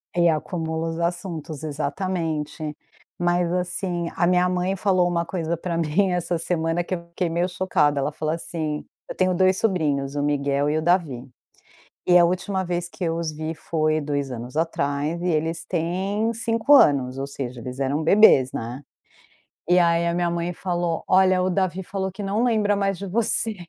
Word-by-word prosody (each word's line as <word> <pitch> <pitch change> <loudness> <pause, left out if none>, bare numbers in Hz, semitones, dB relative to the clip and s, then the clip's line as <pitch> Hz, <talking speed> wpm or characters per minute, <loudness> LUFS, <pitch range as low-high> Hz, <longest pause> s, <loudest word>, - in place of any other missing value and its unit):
E 175 -1 +4
acumula 160 0 -2
os 165 +1 -5
assuntos, 170 -3 -3
exatamente. 155 0 -3 0.4
Mas 175 0 +1
assim, 180 -1 -2
a 175 - +2
minha 180 0 +3
mãe 180 +1 0
falou 185 -2 +2
uma 170 -1 0
coisa 170 -1 -2
pra 170 0 -3
mim 170 +4 +1
essa 175 -1 -1
semana 165 0 -1
que 185 - -3
eu 170 -1 -9
fiquei 170 0 -2
meio 170 +2 0
chocada, 150 -6 +1
ela 140 - -1
falou 155 +1 -2
assim: 160 -2 -4 0.2
"Eu - - -7
tenho 185 0 +2
2 185 +1 +3
sobrinhos, 145 -10 0
o 145 - 0
Miguel 145 0 +1
e 155 - +1
o - - 0
Davi. 160 -7 +1 0.8
E 180 0 +6
a 175 - +6
última 185 +2 0
vez 175 -1 -2
que 175 - -8
eu 165 -1 0
os 165 -2 -2
vi 155 +1 -4
foi 155 -1 0
2 145 -2 -2
anos 125 +2 -7
atrás 155 0 -1
e 180 - -1
eles 165 0 -1
têm 190 +6 -1
5 230 +3 +2
anos, 135 - +5
ou 135 +1 -3
seja, 130 -3 -6
eles 125 +3 -7
eram 140 +3 0
bebês, 160 -8 +6
né". 120 +4 -5 0.9
E 180 +1 +4
aí 170 -1 +3
a 170 - +1
minha 175 0 0
mãe 170 +1 -2
falou: 175 -2 -2
"Olha 185 0 +4
o 185 - +1
Davi 185 0 0
falou 190 0 -4
que 190 - -7
não 205 +4 0
lembra 215 -4 +2
mais 195 -2 0
de 200 - -5
você", 220 +2 0
170 Hz, 185 wpm, -23 LUFS, 155-185 Hz, 0.9 s, E